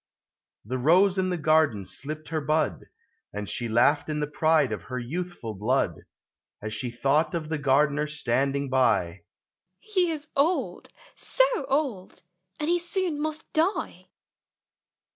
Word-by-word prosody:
The 130 Hz, +4 st, -3 dB
Rose 180 Hz, +8 st, +4 dB
in 185 Hz, 0 st, +1 dB
the 180 Hz, -, -1 dB
garden 155 Hz, -, +2 dB
slipped 150 Hz, +11 st, -7 dB
her 160 Hz, -1 st, -1 dB
bud, 155 Hz, +2 st, 0 dB, 0.5 s
And 105 Hz, 0 st, -5 dB
she 120 Hz, +3 st, -3 dB
laughed 135 Hz, +7 st, +3 dB
in 150 Hz, -1 st, -1 dB
the 150 Hz, -, 0 dB
pride 150 Hz, -2 st, +2 dB
of 110 Hz, -, -3 dB
her 125 Hz, -1 st, -6 dB
youthful 135 Hz, -2 st, -5 dB
blood, 105 Hz, -1 st, +1 dB, 0.7 s
As 110 Hz, +1 st, -5 dB
she 120 Hz, +3 st, -3 dB
thought 140 Hz, +8 st, +1 dB
of 155 Hz, -2 st, -4 dB
the 160 Hz, -2 st, -2 dB
Gardener 145 Hz, +2 st, +2 dB
standing 140 Hz, -1 st, -1 dB
by 115 Hz, -9 st, +1 dB, 0.2 s
— -, -, -67 dB
" 185 Hz, +1 st, -55 dB
He 365 Hz, -3 st, +3 dB
is 310 Hz, -2 st, -4 dB
old 320 Hz, +6 st, 0 dB, 0.2 s
— -, -, -36 dB, 0.2 s
so -, -, +8 dB, 0.2 s
old 265 Hz, -, -2 dB
150 Hz, 135 wpm, -26 LUFS, 125-170 Hz, 0.7 s, so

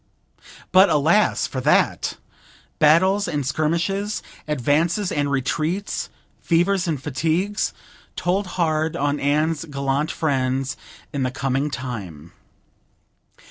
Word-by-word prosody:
But, 190 Hz, +2 st, +7 dB
alas, 160 Hz, +8 st, +3 dB
for 130 Hz, -, -4 dB
that! -, -, +2 dB, 0.6 s
Battles 185 Hz, +7 st, +4 dB
and 150 Hz, -5 st, -2 dB
skirmishes, 170 Hz, +8 st, -1 dB, 0.2 s
advances 155 Hz, -, +1 dB
and 145 Hz, -1 st, 0 dB
retreats, 155 Hz, +8 st, -1 dB, 0.3 s
fevers 175 Hz, +2 st, +2 dB
and 155 Hz, -4 st, -1 dB
fatigues, 165 Hz, +9 st, -1 dB, 0.4 s
told 190 Hz, +2 st, 0 dB
hard 160 Hz, -2 st, +1 dB
on 145 Hz, +1 st, 0 dB
Anne's 150 Hz, +2 st, +1 dB
gallant 140 Hz, 0 st, -1 dB
friends 135 Hz, -4 st, -1 dB, 0.4 s
in 140 Hz, -, -2 dB
the 130 Hz, -, +1 dB
coming 135 Hz, +2 st, -1 dB
time. 95 Hz, -, -7 dB
155 Hz, 100 wpm, -22 LUFS, 140-175 Hz, 0.6 s, But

